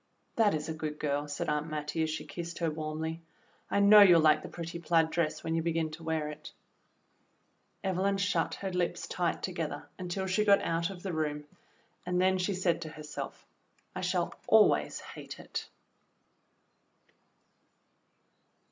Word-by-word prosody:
"That 215 -6 +4
is 150 -1 -3
a 160 - -2
good 155 -1 -4
girl," 145 0 -1
said 145 - -3
Aunt 150 +1 0
Mattie, 150 +1 -3
as 160 - +1
she 155 0 -4
kissed 170 +2 -6
her 165 -2 0
warmly. 160 +1 -4 0.5
"I - - +1
know 205 +1 +9
you'll 180 -4 +8
like 155 -1 +5
the - - -8
pretty 170 0 -6
plaid 165 -1 +2
dress 165 -3 -1
when 160 - -2
you 165 - +1
begin 165 -1 -1
to 160 +2 -9
wear 160 -2 -1
it." 150 - -9 1.3
Evelyn 195 +1 +1
shut 195 0 0
her 195 -1 -4
lips 180 -1 -1
tight - - -1
together - - -4
until 185 +1 -3
she 190 +3 +1
got 200 -1 +5
out 165 +1 0
of 185 -3 -9
the 190 -3 -3
room, 150 -2 -2 0.6
and 180 0 0
then 185 0 +3
she 185 +2 0
said 180 -2 +1
to 160 - -5
herself, 150 -1 -7 0.5
"I - - -3
shall - - 0
always - - +4
hate - - -9
it." - - -6
165 Hz, 165 wpm, -31 LUFS, 155-185 Hz, 1.3 s, know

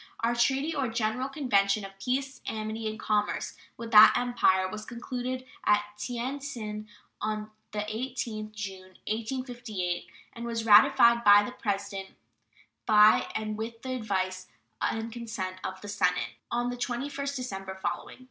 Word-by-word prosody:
Our 230 +1 +2
"treaty, 270 +6 +1
or 275 -4 0
general 230 +3 -1
convention, 210 -8 +2
of 195 0 -12
peace, 265 +5 -2
amity, 220 0 -3
and 215 - -7
commerce" 210 -1 0 0.2
with 230 -1 -7
that 215 -1 +9
Empire 190 -6 +2
was 215 +3 -6
concluded 250 +2 -4 0.2
at 210 0 +4
Tien 245 +5 -3
tsin 215 -6 -6 0.3
on 215 0 -3 0.2
the 210 - -2
18th 215 -1 -4
June, 190 -3 -7
1858, 225 -5 -3 0.3
and 235 0 -7
was 230 -1 -2
ratified 235 +2 +7
by 205 -1 +8
the 245 - -5
President, 200 -4 -4 0.7
by 210 0 +6
and 215 0 -3
with 225 +1 -5
the 260 - -4
advice 185 -5 -2 0.3
and 225 0 -1
consent 210 -6 -4
of 190 0 -4
the 205 - -8
Senate, 200 -3 +1 0.2
on 240 +1 0
the 245 - -5
21st 280 +3 -3
December 195 -7 -5
following. 190 - -4
220 Hz, 145 wpm, -29 LUFS, 205-245 Hz, 0.7 s, that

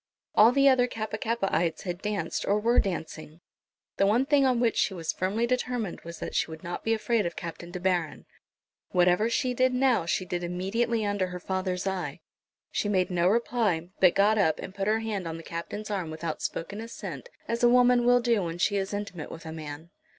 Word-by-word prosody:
All 220 +3 +7
the 275 +2 +4
other 255 -2 +5
Kappa 220 -2 -4
kappaites 195 -8 0
had 180 0 -4
danced 210 -1 -2
or 205 +1 +2
were 235 +3 +3
dancing. 160 -4 -4 0.6
The 195 - +3
one 235 +6 +3
thing 280 -1 +4
on 250 -2 +2
which 235 -2 +2
she 195 -1 +1
was 165 -2 -2
firmly 200 +6 0
determined 245 -5 -2
was 170 0 -9
that - - -6
she - - +1
would 160 0 -9
not 175 +1 -5
be 225 - 0
afraid 220 -3 0
of 170 - -6
Captain 170 0 -7
De 180 +1 -6
Baron. 175 -4 -1 0.7
Whatever 180 +5 +3
she 250 +1 0
did 255 +1 +2
now 250 -9 +2
she 185 - 0
did 175 -1 -3
immediately 210 +6 -1
under 205 -2 0
her 180 0 -6
father's 185 0 -2
eye. 180 -6 -3 0.5
She 205 - -1
made 185 -2 +1
no 175 0 +2
reply, 210 -6 +1
but 185 -2 +5
got 210 +2 +4
up 160 -6 +3
and 190 - -7
put 195 0 -3
her 220 +1 +2
hand 205 -5 -3
on 165 0 -4
the 165 - -10
Captain's 205 +7 -6
arm 185 -5 -2
without 160 0 -4
spoken 200 +6 -4
assent, 230 - -7 0.2
as 230 +1 -2
a 240 - +6
woman 245 0 +5
will 245 0 +5
do 235 -3 +2
when 170 -1 -4
she 200 +3 +1
is 195 +1 -2
intimate 200 -6 -5
with 165 - -10
a 160 - -6
man. 155 +1 -8
195 Hz, 210 wpm, -28 LUFS, 175-230 Hz, 0.7 s, All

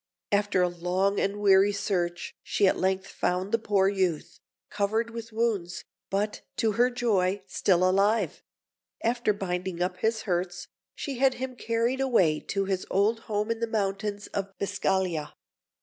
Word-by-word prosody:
After 200 -2 +2
a - - +3
long 180 +3 0
and 200 +1 -1
weary 200 0 +5
search 180 -4 -2
she 200 - +2
at - - +3
length 190 0 +1
found 185 +2 -2
the 230 - +2
poor 200 -3 +2
youth, 185 -5 -1 0.3
covered 220 +3 0
with 230 0 -7
wounds, 215 -6 -1 0.3
but, 205 +2 -1 0.2
to 225 - +2
her 240 +4 +3
joy, 205 -6 0
still 185 -1 +2
alive; 200 +4 +2 0.6
and 230 - +3
after 240 -2 0
binding 185 -3 -3
up 180 +1 -1
his 220 +2 0
hurts, 175 -2 -2 0.3
she 275 -5 -5
had 270 -1 +4
him 255 0 -5
carried 235 +3 0
away 185 -13 +3
to 195 -1 -2
his 190 -1 -1
old 210 +4 +2
home 210 +1 0
in 230 - -2
the 230 - -1
mountains 205 -1 -2
of 200 0 -2
Biscaglia. 190 -6 -1
200 Hz, 160 wpm, -27 LUFS, 185-225 Hz, 0.6 s, weary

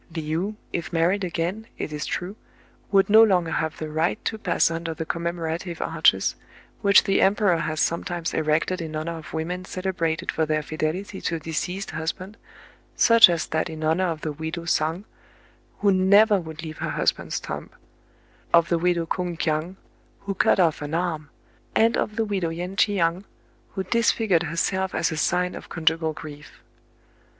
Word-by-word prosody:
Le 155 -1 -3
ou, 195 +6 -2 0.2
if 170 - -3
married 175 +4 +1
again, 180 +5 -3
it 155 - -4
is 150 -1 -4
true, 185 +3 -4 0.6
would 195 -1 +4
no 220 +2 +7
longer 180 -7 +3
have 160 -2 -2
the 155 - -5
right 160 +6 -1
to 220 - -2
pass 170 - +2
under 165 0 -4
the 160 - -4
commemorative 170 +1 -3
arches, - - +2 0.5
which 200 -2 +6
the 195 -2 +2
em 195 +2 +4
peror 185 -6 +2
has 155 0 -2
sometimes 170 0 -1
erected 155 +4 0
in 160 -1 -5
honor 165 +2 -3
of 145 -5 -11
women 175 +3 -3
celebrated 185 -4 -2
for 160 - 0
their 155 -1 0
fidelity 160 +6 -3
to 165 - -1
a - - -4
deceased 180 +5 -4
husband, 180 +5 -4 0.4
— - - -28 0.2
such 230 -4 +8
as 170 -2 0
that 160 0 -1
in 160 -1 -7
honor 165 +4 +2
of 160 -2 -3
the 155 - -3
widow 160 +3 -5
Soung, 165 +2 0 0.8
who 205 -1 +4
never 200 +3 +5
would 160 -1 -8
leave 155 -1 -7
her - - -2
husband's - - -1
tomb; - - -6 0.8
of 170 0 +5
the 170 - +2
widow 175 -1 +1
Koung 175 0 -3
Kiang, 160 +3 -1 0.5
who 200 0 -3
cut 190 - +3
off 165 -5 +2
an 150 +2 -3
arm; 165 -4 -2 0.5
and 230 +1 +4
of 210 - -1
the'widow 205 -6 -1
Yen 175 +3 -5
Tchiang, 185 -3 +1 0.5
who 190 - -1
disfigured 220 -3 +2
herself 190 +3 -1
as 165 - +1
a - - -3
sign 180 +4 +1
of - - -9
conjugal 160 0 +1
grief. 150 -1 -11
170 Hz, 175 wpm, -24 LUFS, 160-190 Hz, 0.8 s, such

